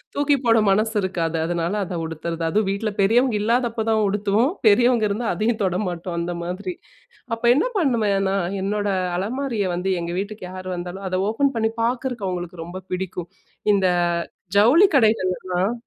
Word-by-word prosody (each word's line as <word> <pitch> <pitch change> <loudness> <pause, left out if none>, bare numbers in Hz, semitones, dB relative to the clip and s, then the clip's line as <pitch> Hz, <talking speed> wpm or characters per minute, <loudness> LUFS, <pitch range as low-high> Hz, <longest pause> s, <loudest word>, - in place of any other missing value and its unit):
தூக்கி 285 0 +3
போட 230 -1 +5
மனசு 215 +3 +1
இருக்காது. 170 -4 -1
அதனால 170 +2 -1
அத 175 -1 -5
உடுத்துறது. 165 +1 -5
அதுவும் 210 +3 +1
வீட்ல 210 +2 -2
பெரியவங்க 230 +3 +3
இல்லாதப்ப 230 0 0
தான் 220 -1 +2
உடுத்துவோம். 205 +6 +1 0.2
பெரியவங்க 235 +1 +4
இருந்தா 220 +4 -2
அதையும் 220 +5 0
தொட 185 -1 0
மாட்டோம் 175 0 -4
அந்த 170 +1 -2
மாதிரி. 180 +2 -4 0.6
அப்ப 230 - -18
என்ன 295 - +2
பண்ணுவேன்னா, 205 - +1 0.3
என்னோட 205 +1 -1 0.3
அலமாரிய 225 +1 -2
வந்து 185 +2 -1
எங்க 170 0 -4
வீட்டுக்கு 205 0 -5
யாரு 185 0 -7
வந்தாலும், 180 +2 -6
அதை 185 0 0
ஓப்பன் 275 +5 +1
பண்ணி 225 0 +1
பார்க்குறக்கு 240 -3 -2
அவுங்களுக்கு 175 -2 -5
ரொம்ப 185 +2 -8
பிடிக்கும். 180 -1 -4 0.4
இந்த 195 -2 +2 0.7
ஜவுளி 265 - +6
கடைகள் 215 -6 +3
எல்லாம் 185 +4 -1
200 Hz, 155 wpm, -22 LUFS, 180-230 Hz, 0.7 s, ஜவுளி